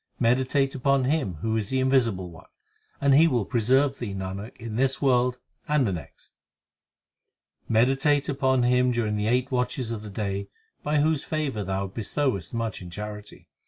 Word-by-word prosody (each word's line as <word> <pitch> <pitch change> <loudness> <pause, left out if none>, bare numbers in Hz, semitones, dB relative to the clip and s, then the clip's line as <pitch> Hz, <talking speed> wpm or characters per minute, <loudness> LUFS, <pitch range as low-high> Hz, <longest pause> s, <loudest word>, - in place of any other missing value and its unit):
Meditate 130 +3 +2
upon 135 0 +2
Him 130 - 0
who 110 0 0
is 110 -3 -2
the 130 - 0
Invisible 115 -9 +1
One, 80 - -14 0.5
And 140 -1 +3
he 155 +4 +7
will 120 -9 +1
preserve 130 +5 +2
thee, 105 -5 -4
Nanak, 95 +3 -6
in 115 -1 -6
this 135 +2 +1
world 125 -2 +2 0.3
and 150 -3 +2
the 100 - 0
next. 80 -6 -9 1.3
5 - - -30
Meditate 135 +5 +3
upon 130 -2 +1
Him 125 +1 +3
during 115 -3 0
the 105 0 -1
eight 125 +3 +1
watches 125 -1 -1
of 110 -2 -4
the 105 - -8
day 100 -1 -3 0.3
By 150 0 +1
whose 155 -1 +1
favour 145 -9 -2
thou 95 +1 -2
bestowest 110 +2 -2
much 115 -3 -3
in 90 - -8
charity. 105 +2 -8
125 Hz, 170 wpm, -26 LUFS, 105-135 Hz, 1.3 s, he